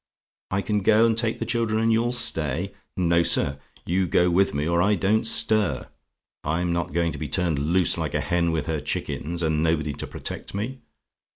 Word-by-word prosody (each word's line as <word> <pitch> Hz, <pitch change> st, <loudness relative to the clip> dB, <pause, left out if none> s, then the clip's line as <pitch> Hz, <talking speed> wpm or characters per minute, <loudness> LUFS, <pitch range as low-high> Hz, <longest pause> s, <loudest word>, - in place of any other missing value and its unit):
"I 100 Hz, +1 st, -1 dB
CAN 105 Hz, -1 st, 0 dB
GO 110 Hz, +3 st, +4 dB
AND 115 Hz, -1 st, +2 dB
TAKE 115 Hz, 0 st, 0 dB
THE 115 Hz, -, -4 dB
CHILDREN, 115 Hz, -2 st, 0 dB
AND 115 Hz, +1 st, +2 dB
YOU'LL 115 Hz, +2 st, +1 dB
STAY? 85 Hz, -, +1 dB, 0.2 s
"No, 85 Hz, -2 st, +3 dB
sir: 70 Hz, -4 st, +1 dB, 0.3 s
you 90 Hz, +2 st, 0 dB
go 90 Hz, +2 st, +2 dB
with 95 Hz, +3 st, +3 dB
me, 70 Hz, +2 st, -2 dB
or 85 Hz, 0 st, +2 dB
I 105 Hz, +3 st, +3 dB
don't 105 Hz, +5 st, +1 dB
stir. 110 Hz, -, +2 dB, 0.5 s
I'm 85 Hz, +3 st, -1 dB
not 85 Hz, -3 st, -2 dB
going 85 Hz, +1 st, 0 dB
to 70 Hz, -, -7 dB
be 75 Hz, -, -4 dB
turned 85 Hz, -1 st, 0 dB
loose 85 Hz, +5 st, +1 dB
like -, -, -3 dB
a -, -, +1 dB
hen 85 Hz, -1 st, 0 dB
with 80 Hz, -2 st, -2 dB
her 80 Hz, -2 st, -2 dB
chickens, 85 Hz, +4 st, -3 dB
and 80 Hz, -1 st, 0 dB
nobody 80 Hz, -2 st, 0 dB
to -, -, -6 dB
protect -, -, -7 dB
me. 120 Hz, +6 st, -4 dB
85 Hz, 200 wpm, -24 LUFS, 80-110 Hz, 0.5 s, GO